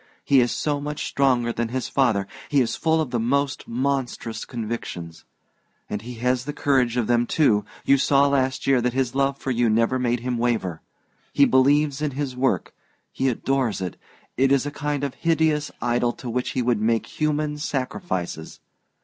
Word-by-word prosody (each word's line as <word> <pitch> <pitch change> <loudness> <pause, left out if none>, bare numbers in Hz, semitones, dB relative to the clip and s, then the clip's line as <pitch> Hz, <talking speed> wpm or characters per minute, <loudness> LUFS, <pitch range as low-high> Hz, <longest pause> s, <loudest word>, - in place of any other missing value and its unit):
He 135 -2 +5
is 120 - +1
so 145 -2 -1
much 150 +1 -4
stronger 125 -4 +1
than 120 0 -1
his 125 +2 -3
father 115 -8 +2 0.2
he 145 - +3
is 120 -3 +1
full 160 0 +1
of 145 -6 -3
the 120 - 0
most 140 +4 0
monstrous 125 -2 -2
convictions. 110 -8 -6 0.7
And 105 - -2
he 120 +2 -8
has 125 +2 0
the 145 - -4
courage 130 -5 +1
of 120 - +1
them, 120 0 +2
too 105 -10 +2 0.2
you 140 0 +4
saw 140 +1 +4
last 130 -2 0
year 135 -2 +3
that 125 0 0
his 130 -2 0
love 135 0 +1
for 135 - -3
you 120 -1 +2
never 115 +4 +2
made 120 -1 0
him 125 -1 -2
waver. 110 -9 -1 0.5
He 140 - +6
believes 140 +2 +3
in 150 -3 -1
his 140 -3 -2
work; 125 -7 0 0.4
he 135 - 0
adores 130 -2 0
it 90 -2 -4 0.4
it 135 +1 +3
is 140 0 +3
a 145 - -3
kind 145 -1 -3
of 140 - -2
hideous 160 -3 +1
idol 120 0 +1
to 125 - -7
which 125 +2 -2
he 125 - +2
would 120 -3 +1
make 115 +1 +1
human 150 -1 0
sacrifices! 130 - -4
130 Hz, 185 wpm, -24 LUFS, 120-140 Hz, 0.7 s, He